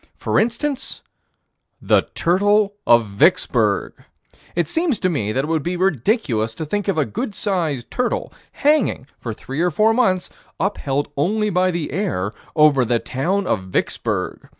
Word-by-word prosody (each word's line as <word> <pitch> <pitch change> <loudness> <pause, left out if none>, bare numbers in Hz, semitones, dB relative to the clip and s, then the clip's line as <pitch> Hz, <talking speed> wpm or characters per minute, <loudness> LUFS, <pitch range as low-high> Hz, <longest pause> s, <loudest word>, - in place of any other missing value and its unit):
For - - +1
instance, 250 +5 -2 0.8
the - - +2
turtle 205 +4 +2
of 115 -1 +6
Vicksburg. 100 -1 +2 0.6
It 170 -2 +1
seems 325 - 0
to 185 - 0
me 110 - -1
that 130 +5 0
it - - -3
would 160 -1 0
be 175 +4 -2
ridiculous 150 - 0
to 160 - -4
think 205 +6 -2
of 195 -4 0
a 155 - +2
good 200 - -4
sized 165 - -2
turtle 250 -1 -2 0.2
hanging, 290 - +2
for 115 - -5
three 135 +7 -5
or 180 - +3
four 215 +7 +3
months, 190 -7 +1 0.3
upheld 145 -8 -1
only 210 +8 +1
by 185 +1 +2
the 170 -4 -3
air, 140 - -2 0.2
over 150 -4 +5
the 120 0 +1
town 180 - -1
of 95 - -1
Vicksburg. 95 - -2
175 Hz, 155 wpm, -21 LUFS, 135-205 Hz, 0.8 s, of